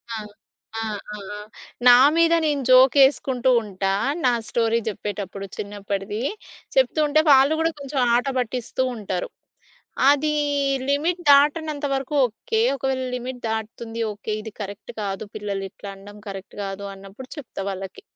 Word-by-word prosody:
ఆ! - - -3 0.6
ఆ! - - -2 0.3
ఆ! - - -7 0.2
ఆ! - - -7 0.5
నా 245 - +10 0.2
మీద 335 0 +4
నేను 295 -2 +1
జోక్ 255 +1 +7
యేసుకుంటుంటా. 245 -8 +2 0.3
నా 250 - +5 0.2
స్టోరీ 230 0 +1
జెప్పేటప్పుడు 200 -2 -4
చిన్నప్పటిది. 205 +1 -4 0.5
చెప్తూ 265 +3 +3
ఉంటే 300 +2 +4
వాళ్ళు 275 +2 +6
గూడా 325 0 +2
కొంచెం 280 0 -3 0.2
ఆటపట్టిస్తూ 250 -1 -1
ఉంటరు. 195 -5 -4 0.8
అది 295 +1 +2 0.6
లిమిట్ 325 +5 0
దాటనంత 295 +1 +4
వరకు 270 +2 -3
ఓకే. 220 -1 -2
ఒకవేళ 265 -1 -1
లిమిట్ 250 0 -6
దాటుతుంది, 225 +1 -4
ఓకే. 210 +1 -6
ఇది 220 0 -8
కరెక్ట్ 200 0 -8
కాదు, 195 +1 -4
పిల్లలు 200 -2 -3
ఇట్లనడం 200 +1 -11
కరెక్ట్ 195 -1 -8
గాదు 195 +1 -5
అన్నప్పుడు 195 +6 -12
చెప్తా 270 -8 -8
వాళ్ళకి. 195 - -7
235 Hz, 130 wpm, -23 LUFS, 205-270 Hz, 0.8 s, నా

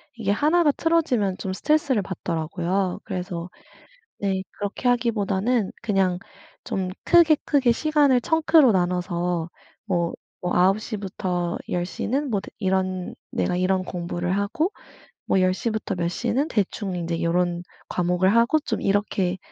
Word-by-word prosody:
이게 210 -4 -1
1 310 +10 +3
가 295 - +5
틀어지면 265 - +1
좀 190 -1 -3
스트레스를 285 -2 +1
받더라고요. 180 +2 -2
그래서 180 -3 -4 0.7
네 190 -2 -1
그렇게 205 +5 -2
하기보다는 230 -2 +1
그냥 190 -5 +1 0.5
좀 185 -1 -2 0.2
크게, 330 -3 +6
크게 270 -5 +3
시간을 290 -3 +3
청크로 315 -6 +4
나눠서 175 -2 0 0.4
뭐 175 -4 0 0.3
뭐 - - 0
9:00 195 +5 +2
부터 180 -3 -2
10:00 175 +1 -2
는 275 +4 0
뭐 200 - +1
드 - - -10
이런 185 -2 -1 0.2
내가 180 - 0
이런 185 0 +1
공부를 175 +1 -3
하고 300 - 0 0.5
뭐 190 - +2
10:00 185 +5 +1
부터 215 -3 -3
몇 170 -1 -1
시는 270 - -1
대충 200 -2 -1
인제 170 -1 -2
요런 175 +1 0 0.3
과목을 180 +3 +2
하고 235 +7 +4
좀 - - -3
이렇게 195 -2 0
195 Hz, 260 characters per minute, -24 LUFS, 180-240 Hz, 0.7 s, 크게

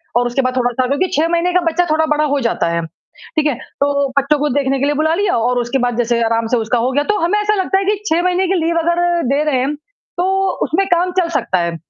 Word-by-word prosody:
और 245 0 +2
उसके 245 +3 0
बाद 255 0 -2
थोड़ा 245 -1 +1
सा 255 +1 0
क्योंकि 285 +8 0
6 320 - +2
महीने 345 +1 0
का 360 - +4
बच्चा 350 +2 0
थोड़ा 315 +1 +2
बड़ा 300 - +1
हो 285 - +1
जाता 170 - -1
है, 170 0 -1 0.6
ठीक 310 - +2
है, 290 - 0 0.3
तो 280 -1 +1
बच्चों 280 +1 +1
को 295 0 0
देखने 275 -1 0
के 275 - +1
लिए 290 - +1
बुला 315 +2 +1
लिया 390 -3 +1
और 245 +2 +1
उसके 240 +3 -1
बाद 245 -2 -2
जैसे 235 -1 +1
आराम 230 0 0
से - - +4
उसका 230 +2 0
हो - - 0
गया 290 +2 +1
तो - - -1
हमें 345 +6 +1
ऐसा 420 0 +1
लगता 385 -1 0
है 390 - -2
कि 415 - +2
6 330 +2 +2
महीने 365 +1 +1
की 385 - +1
लीव 335 0 0
अगर 340 +1 +1 0.3
दे 290 +2 +1
रहे 295 -4 +1
हैं, 275 +4 -1
तो 385 +3 -3 0.2
उसमें 390 +4 0
काम 355 0 +1
चल 335 - 0
सकता 185 - -1
है, 170 -1 -2
295 Hz, 270 wpm, -17 LUFS, 250-355 Hz, 0.6 s, का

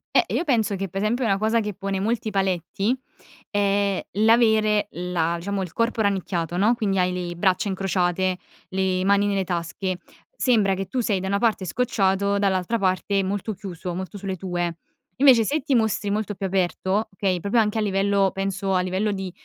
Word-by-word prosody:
Eh, - - +5
io - - +1
penso 230 - +1
che 195 0 -4
per 195 +3 -3
esempio 235 +5 0
una 195 -4 +2
cosa 220 +2 +1
che 210 -1 -3
pone 195 0 -3
molti 220 +1 -1
paletti, 195 +2 0 0.6
è 200 -1 +1
l'avere 220 -2 +4
la 170 -1 -1
diciamo, 195 +3 -3
il 180 -3 -5
corpo 230 -1 0
rannicchiato 180 -4 -1
no. 215 +5 +3
Quindi 200 -5 0
hai 180 0 +1
le 175 -1 -4
braccia 190 +2 +1
incrociate, 185 -1 0 0.3
le 185 -1 0
mani 200 +1 +4
nelle 195 -2 0
tasche, 175 +1 -3 0.4
sembra 215 - +3
che 190 0 -3
tu 255 - -2
sei 205 -5 0
da 190 - -3
una 200 +1 +1
parte 220 -4 +1
scocciato 200 -2 +1
dall'altra 195 +2 +1
parte 195 0 +1
molto 205 +3 -2
chiuso, 180 -3 -6
molto 190 +2 -6
sulle 195 -1 -4
tue. 175 -2 -3 0.5
Invece 255 -5 +7
se 295 +4 0
ti 270 - 0
mostri 220 -3 +1
molto 210 0 -1
più 195 0 -3
aperto, 190 +3 0
okay, 190 -2 0
proprio 210 +6 +2
anche 210 +1 -1
a - - +1
livello, 195 -1 +2
penso, 195 0 -2
a 185 - +3
livello 190 +3 -1
di, 190 -2 -4
195 Hz, 185 wpm, -24 LUFS, 185-215 Hz, 0.6 s, Invece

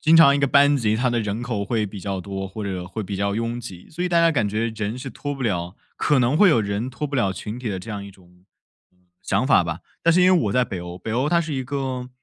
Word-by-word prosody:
经 160 +1 +5
常 150 -4 +8
一 - - +1
个 140 - +3
班 145 +1 +5
级 110 -4 +1
它 125 +1 +1
的 120 -1 0
人 105 +2 -3
口 115 -5 -2
会 110 0 0
比 100 0 -8
较 95 -1 -3
多， 95 0 -5
或 105 +2 -6
者 95 -3 -4
会 105 +4 -5
比 100 0 -5
较 100 +1 0
拥 115 +2 -2
挤， 95 -7 -10
所 170 +3 -4
以 180 - 0
大 170 - +3
家 165 -1 +4
感 110 -7 +1
觉 110 +3 -1
人 110 +3 -3
是 130 0 -6
脱 145 +5 -5
不 135 - -6
了 90 -5 -2 0.2
可 145 -3 +2
能 125 +4 +2
会 205 +1 +6
有 120 -9 +4
人 100 +4 -2
脱 150 +4 -4
不 145 - -7
了 100 -7 +1
群 105 +5 -6
体 125 - -4
的 95 -2 -3
这 110 +5 -8
样 100 -1 -5
一 100 - -10
种， 90 -1 -22 0.5
嗯， 90 - -35 0.2
想 - - 0
法 - - +5
吧。 - - -4 0.2
但 170 - +4
是 180 +1 +4
因 185 0 +6
为 165 - +2
我 100 - 0
在 125 +2 +3
北 95 -7 -5
欧， 90 +1 -8
北 110 - -5
欧 130 +5 +1
它 170 - +3
是 160 -2 -4
一 130 - -2
个， 130 -2 -3
115 Hz, 320 characters per minute, -23 LUFS, 100-140 Hz, 0.5 s, 常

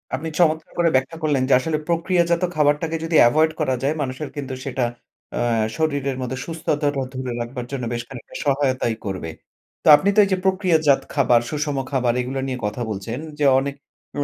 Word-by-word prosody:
আপনি 155 +5 -4
চমৎকার 160 0 +2
করে 170 -1 +3
ব্যাখ্যা 135 +5 0
করলেন 145 -4 +2
যে - - +5
আসলে, 155 +3 -1
"প্রক্রিয়াজাত 170 0 +1
খাবারটাকে 150 +2 +2
যদি 165 0 -1
এভয়েড 155 +5 +3
করা 130 -4 +1
যায়, 140 +3 +2
মানুষের 135 +2 -4
কিন্তু 140 -2 -5
সেটা 130 -2 -1 0.5
অ্যা 120 - 0 0.3
শরীরের 145 -4 -1
মধ্যে 130 +1 -3
সুস্থতাটা 150 -4 -1
ধরে 130 -1 -4
রাখবার 120 +1 -5
জন্য 135 -3 -4
বেশ 120 0 -3
খানিকটা 125 -4 -11
সহায়তাই 135 -4 +1
করবে।" 95 -4 -4 0.5
তো - - -4
আপনি 195 +7 +1
তো - - +5
এইযে 190 -1 0
প্রক্রিয়াজাত 170 -7 +3
খাবার, 125 -4 +4
সুষম 150 -2 -2
খাবার, 125 -3 +1
এগুলা 135 +2 -3
নিয়ে 130 -1 -3
কথা 105 +4 -3
বলছেন, 110 +4 -4 0.2
যে 145 - +2
অনেক 140 +1 -3 0.4
এম 145 - 0
140 Hz, 175 wpm, -22 LUFS, 130-160 Hz, 0.5 s, যে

